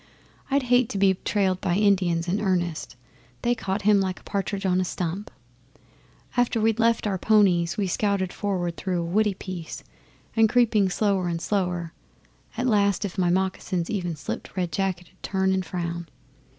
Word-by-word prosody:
I'd 280 0 +2
hate 245 -1 +3
to - - -3
be 195 -1 +4
trailed 190 -3 +1
by 175 -2 +1
Indians 180 -4 +2
in 195 +4 0
earnest. 175 -8 -1 0.5
They 240 - +3
caught 200 -3 -3
him 205 -1 +5
like 185 -1 -2
a - - -23
partridge 200 0 -3
on 185 0 +2
a - - +1
stump. 180 +2 -3 1.1
After 245 -2 +2
we'd 225 +1 +2
left 230 0 +2
our 195 -3 -1
ponies, 185 -6 +3
we 205 - +1
scouted 190 0 0
forward 180 -4 -2
through 185 -2 -1
a - - -3
woody 205 +3 +1
piece, 180 -4 -7 0.5
and, 225 -1 +5
creeping 220 -5 +3
slower 195 -1 +1
and 170 -1 -2
slower, 180 -3 -1 0.6
at 245 - 0
last 205 -4 +2
if 195 0 -5
my 180 -1 +3
moccasins 185 -1 -1
even 175 -6 -2
slipped 150 +5 -6
Red 180 -2 -1
Jacket 180 0 -2
'ud 185 - -30
turn 190 -1 +1
and 190 0 0
frown. 170 -1 -4
190 Hz, 175 wpm, -25 LUFS, 175-210 Hz, 1.1 s, him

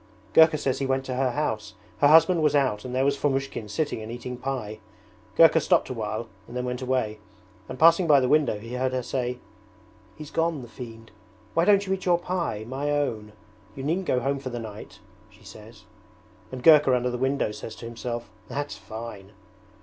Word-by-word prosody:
'Gurka 160 -1 +6
says 135 -2 -1
he 135 - -1
went 135 0 0
to 130 - -4
her 130 0 +1
house. 110 -6 -3 0.2
Her 145 - +5
husband 165 +3 +6
was 150 -1 +2
out 130 -7 +1
and 125 0 -5
there 130 +1 +2
was 140 0 +2
Fomushkin 135 -6 -2
sitting 145 +1 -2
and 110 +1 -7
eating 120 +1 -6
pie. 120 -5 -5 0.6
Gurka 165 +2 +7
stopped - - +2
awhile 110 -1 -4 0.2
and 120 +2 -7
then 125 - -2
went 125 0 -4
away, 125 -5 -1 0.5
and - - -6
passing 170 +3 +5
by 145 -3 +6
the 130 - +1
window 145 -6 +2
he 115 +3 -9
heard 130 +1 -1
her 130 -1 -1
say, 125 0 -2 0.8
"He's 150 -2 -10
gone, 165 -4 0
the - - -10
fiend.... 115 -2 -10 0.4
Why 165 - +2
don't 200 0 +4
you 190 - 0
eat 190 - -4
your 175 -1 +5
pie, 170 - -3
my 135 +4 -3
own? 115 -8 -2 0.4
You 135 - -6
needn't 175 +6 -1
go 125 - +2
home 140 +3 -1
for 135 -1 -6
the 120 - -5
night," 110 -3 -9 0.3
she 105 +1 -21
says. 110 +1 -13 0.7
And 130 -1 -7
Gurka 150 -5 +7
under 125 0 0
the 125 - -4
window 135 -3 0
says 110 +1 -8
to - - -10
himself, 120 0 -5 0.2
"That's 145 0 -4
fine!"' 105 -1 -9
130 Hz, 200 wpm, -25 LUFS, 115-145 Hz, 0.8 s, Gurka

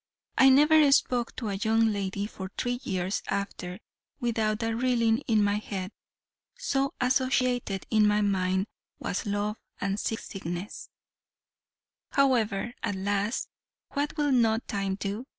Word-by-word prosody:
I 270 - +7
never 300 +2 +6
spoke 245 -3 +2
to 225 -4 -3
a - - -2
young 220 +1 +2
lady 200 0 -2
for 190 -3 -7
three 245 0 -1
years 185 -2 -2
after, 195 -2 -3 0.4
without 220 -2 0
a 225 0 0
reeling 235 -2 +2
in 220 -3 +3
my 205 0 +2
head, 195 -2 -5 0.7
so 275 - -1
associated 255 -5 +1
in 215 -1 +5
my 210 0 +3
mind 190 -1 +1 0.3
was - - -3
love 205 +1 -1 0.2
and 200 +1 -1
sea 225 - -1
sickness. 190 -2 -6 1.2
However, 240 -5 +2
at 205 - -1
last, 205 +3 -1 0.4
what 290 +3 -2
will 295 -1 +2
not 230 -2 +2
time 195 -2 -1
do? 205 +6 -4
215 Hz, 135 wpm, -28 LUFS, 200-245 Hz, 1.2 s, I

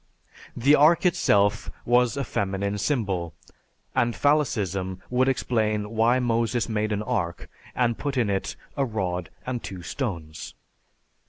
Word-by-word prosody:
"_) - - -17 0.2
The 140 +3 +6
ark 155 +5 +5
itself 105 - +2 0.2
was 125 +2 +3
a 140 - 0
feminine 100 -2 -2
symbol, 95 - -1 0.6
and 120 -1 +1
phallicism 100 - 0
would 130 +1 +3
explain 110 -5 0
why 115 +2 +3
Moses 120 -1 0
made 110 -1 -1
an 105 0 -1
ark 85 -5 -2 0.3
and 120 -2 +1
put 140 -2 -2
in 120 -4 +2
it 100 -1 -2 0.2
a 140 - +1
rod 90 -8 -2 0.2
and 125 -2 -3
two 90 -3 -7
stones. 85 - -5
110 Hz, 140 wpm, -25 LUFS, 100-125 Hz, 0.6 s, The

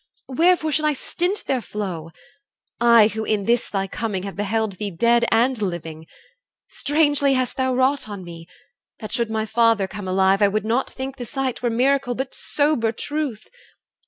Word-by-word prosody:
Wherefore 320 +3 +2
should 305 +1 +1
I 300 - +3
stint 355 +8 -2
their 260 -2 0
flow? 185 -8 -5 0.7
I, 235 -2 +6
who 220 0 -4
in 210 -2 -1
this 235 +2 +1
thy 195 -1 -1
coming 195 -1 -3
have 195 -1 -6
beheld 210 -1 -2
Thee 210 - -2
dead 235 +6 +2
and 240 +1 +2
living? 165 -4 -4 0.6
Strangely 290 -2 +2
hast 255 -1 -1
thou 260 -1 0
wrought 260 -2 +1
On 200 -2 -7
me; 165 -1 -10 0.5
that 215 -2 -8
should 235 0 0
my 220 0 -1
father 225 -3 +2
come 200 0 -7
alive, 190 +2 +2
I 205 - +6
would 210 +1 -1
not 235 +4 0
think 265 +1 -6
the 245 - -6
sight 270 -2 -3
were 245 - +1
miracle, 255 +1 +1
But 265 +1 -4
sober 285 -7 +1
truth. 285 -2 -4
230 Hz, 175 wpm, -22 LUFS, 205-265 Hz, 0.7 s, I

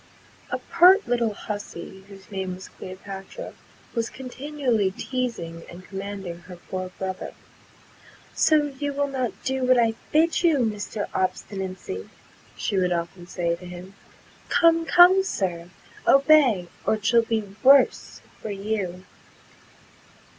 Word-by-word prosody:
A - - -1
pert 370 +4 +5
little 235 -3 0
hussey, 195 -2 -7
whose 195 0 -14
name 190 -2 -3
was 185 +1 -11
Cleopatra, 195 - -9 0.4
was 230 -1 -1
continually 255 -5 -1
teasing 195 -7 -4
and 180 +1 -11
commanding 195 -3 -6
her 180 +1 -11
poor 185 +1 -6
brother. 190 -1 -5 1.0
"So, 295 -2 +3
you 285 -1 -2
will 285 0 0
not 255 -4 -1
do 265 0 -1
what 255 0 +4
I 230 -2 +3 0.2
bid 325 +2 +3
you, 335 -4 +4
Mr. 210 -3 -2
Obstinacy?" 185 - -3 0.5
she 200 - -1
would 180 -1 +2
often 175 +1 -3
say 170 -2 -1
to 180 - -13
him: 180 +2 -10 0.6
"Come, 330 -1 +4
come, 360 +2 +7
Sir, 175 - -3 0.4
obey, 275 - +5 0.2
or - - +2
it 215 -1 -9
shall 235 +1 +5
be 220 -3 -3
worse 275 +1 +4 0.2
for - - -5
you." 195 -3 -3
205 Hz, 130 wpm, -25 LUFS, 185-265 Hz, 1.0 s, come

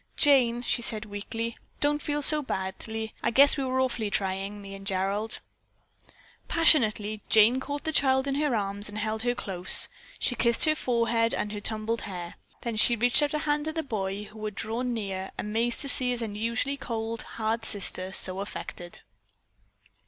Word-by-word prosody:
"Jane," 245 -5 +4
she 240 - 0
said 215 -2 +3
weakly, 225 +3 -4 0.2
"don't 295 0 +1
feel 295 0 -1
so 305 +1 +4
badly. 220 0 -4
I - - +1
guess 280 +4 +6
we 275 - -2
were 260 0 0
awfully 245 -5 0
trying, 195 0 -2
me 195 -1 -9
and 195 0 -9
Gerald." 195 +3 -1 1.1
Passionately 215 -10 +3
Jane 225 +4 +6
caught 285 +2 -5
the 315 - -1
child 265 -2 +3
in 275 - -1
her 290 -3 +1
arms 205 0 -2
and 210 - -7
held 220 +1 -2
her 245 +1 0
close. 185 -5 -1 0.3
She - - +1
kissed 235 -1 +3
her 310 - +4
forehead 235 -4 +1
and 210 - -2
her 210 -1 -5
tumbled 220 +2 -1
hair. 175 -3 -6 0.3
Then 235 -2 -3
she 235 +2 +5
reached 245 +5 +4
out 295 +1 +1
a - - 0
hand 295 0 +1
to 315 - -3
the 320 0 -2
boy, 200 -5 -3
who 215 +1 -11
had 210 -2 -4
drawn 240 +5 -2
near 195 -4 -3
amazed 230 +3 0
to 280 - -4
see 255 -1 +3
his 245 -1 -1
usually 230 +6 -2
cold, 230 -3 -3 0.2
hard 225 +1 -1
sister 190 -3 0
so 185 0 -3
affected. 175 -3 -6
225 Hz, 180 wpm, -27 LUFS, 205-260 Hz, 1.1 s, guess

